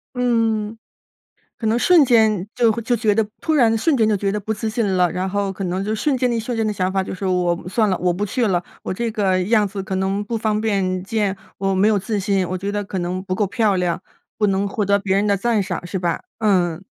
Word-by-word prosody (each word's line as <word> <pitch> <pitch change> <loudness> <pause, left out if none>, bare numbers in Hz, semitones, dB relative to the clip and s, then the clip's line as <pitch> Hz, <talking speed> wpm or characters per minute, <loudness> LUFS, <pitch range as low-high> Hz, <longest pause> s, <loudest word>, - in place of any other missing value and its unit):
嗯。 225 -3 0 0.8
可 225 - -1
能 225 - +2
瞬 330 +3 +5
间 220 -6 +3
就 235 -2 +4
会 230 +2 -3
就 240 +2 +1
觉 215 -2 +2
得 220 0 +1
突 315 - 0
然 230 -6 +4
瞬 280 +6 +2
间 220 -2 +3
就 215 - +2
觉 195 0 -1
得 210 - -2
不 220 +2 -3
自 220 +1 -3
信 220 -1 -1
了， 180 -1 +3
然 185 +1 -2
后 200 0 -1
可 195 0 -5
能 185 +2 -2
就 210 +2 -2
瞬 265 +5 0
间 250 -1 +1
一 230 - 0
瞬 235 +2 -3
间 225 -1 0
的 215 - 0
想 185 -3 -1
法 190 -1 +1
就 - - -6
是 190 +1 -5
我 180 -2 0
算 215 +2 +1
了， 185 - +1
我 180 -1 +1
不 200 +4 -2
去 230 +3 0
了， 180 -3 0 0.2
我 - - -4
这 230 +4 -2
个 195 -4 +1
样 210 +1 +3
子 195 0 -5
可 190 -1 -4
能 195 +2 -1
不 230 +2 -3
方 215 -1 0
便 190 -4 0
见， 205 -1 -1 0.2
我 195 0 0
没 200 +3 +4
有 210 -2 +2
自 210 +2 -3
信， 195 -2 0
我 185 - -3
觉 200 +2 -3
得 205 0 -2
可 195 - -5
能 180 +1 -3
不 185 -1 -3
够 205 +1 +1
漂 200 +1 +1
亮， 180 -1 -1 0.4
不 210 - +2
能 195 +1 0
获 205 +1 -1
得 200 +1 +3
别 195 -1 0
人 205 - +1
的 200 - +3
赞 220 +2 +1
赏， 185 - -4
是 185 +2 -3
吧？ 175 -2 -1 0.2
嗯， 180 -6 +1
205 Hz, 285 characters per minute, -21 LUFS, 190-220 Hz, 0.8 s, 瞬